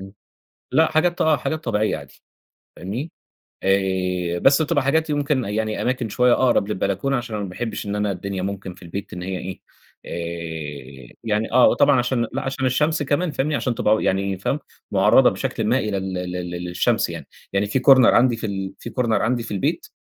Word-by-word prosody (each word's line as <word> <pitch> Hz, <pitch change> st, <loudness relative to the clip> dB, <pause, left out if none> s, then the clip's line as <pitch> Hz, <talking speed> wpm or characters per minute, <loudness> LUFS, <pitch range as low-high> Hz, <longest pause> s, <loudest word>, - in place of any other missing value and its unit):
امم 95 Hz, 0 st, -10 dB, 0.6 s
لأ، 160 Hz, 0 st, +3 dB
حاجات 175 Hz, +3 st, +1 dB
آه 155 Hz, -2 st, +4 dB
حاجات 155 Hz, +5 st, -3 dB
طبيعيَّة 110 Hz, -5 st, 0 dB
عادي، 70 Hz, -3 st, -14 dB, 0.6 s
فاهمني؟ 120 Hz, -, -5 dB, 0.5 s
آآ 90 Hz, -2 st, 0 dB
بس 140 Hz, -, +5 dB
بتبقى 145 Hz, -2 st, +1 dB
حاجات 160 Hz, +4 st, +1 dB
يمكن 145 Hz, -2 st, 0 dB
يعني 110 Hz, +1 st, -2 dB
أماكن 125 Hz, -2 st, -1 dB
شوية 125 Hz, +3 st, +3 dB
أقرب 120 Hz, -6 st, +2 dB
للبلكونة، 105 Hz, +6 st, -1 dB
عشان 120 Hz, -2 st, -5 dB
أنا 105 Hz, -, -3 dB
ما 95 Hz, -, -5 dB
باحبش 105 Hz, +3 st, -4 dB
إن 100 Hz, 0 st, -3 dB
أنا 105 Hz, -1 st, 0 dB
الدنيا 95 Hz, +1 st, -4 dB
ممكن 95 Hz, -1 st, -4 dB
في 95 Hz, -, -19 dB
البيت 95 Hz, +4 st, -6 dB
إن 90 Hz, -, -6 dB
هي 95 Hz, 0 st, -3 dB
إيه 95 Hz, +1 st, -7 dB, 0.5 s
آآ 80 Hz, -6 st, -6 dB
يعني 110 Hz, 0 st, -1 dB
آه، 125 Hz, 0 st, +6 dB
وطبعًا 140 Hz, -2 st, +4 dB
عشان 120 Hz, -1 st, 0 dB
لأ -, -, -2 dB
عشان 135 Hz, 0 st, -3 dB
الشَّمس 150 Hz, +5 st, +1 dB
كمان، 150 Hz, +4 st, 0 dB
فاهمني؟ 145 Hz, +2 st, -1 dB
عشان 125 Hz, -2 st, -1 dB
تبقى، 110 Hz, 0 st, +2 dB
يعني 95 Hz, 0 st, 0 dB
فاهم، 135 Hz, +10 st, -1 dB, 0.3 s
مُعرَّضة -, -, +5 dB
بشكلٍ -, -, -3 dB
ما 125 Hz, +4 st, +3 dB
إلى 105 Hz, -4 st, -2 dB
ال 95 Hz, -1 st, -3 dB
ال 90 Hz, 0 st, -4 dB
لل 90 Hz, -1 st, -5 dB
للشَّمس 90 Hz, 0 st, 0 dB
يعني، -, -, -7 dB, 0.3 s
يعني 100 Hz, +1 st, +2 dB
في 105 Hz, +6 st, 0 dB
Corner 130 Hz, -1 st, +7 dB
عندي 125 Hz, -1 st, +4 dB
في 115 Hz, -, -5 dB
ال 95 Hz, -1 st, -4 dB
في -, -, -7 dB
Corner 120 Hz, +1 st, -1 dB
عندي 120 Hz, +1 st, 0 dB
في 110 Hz, -, -6 dB
البيت، 95 Hz, -, -1 dB
105 Hz, 195 wpm, -22 LUFS, 95-130 Hz, 0.6 s, Corner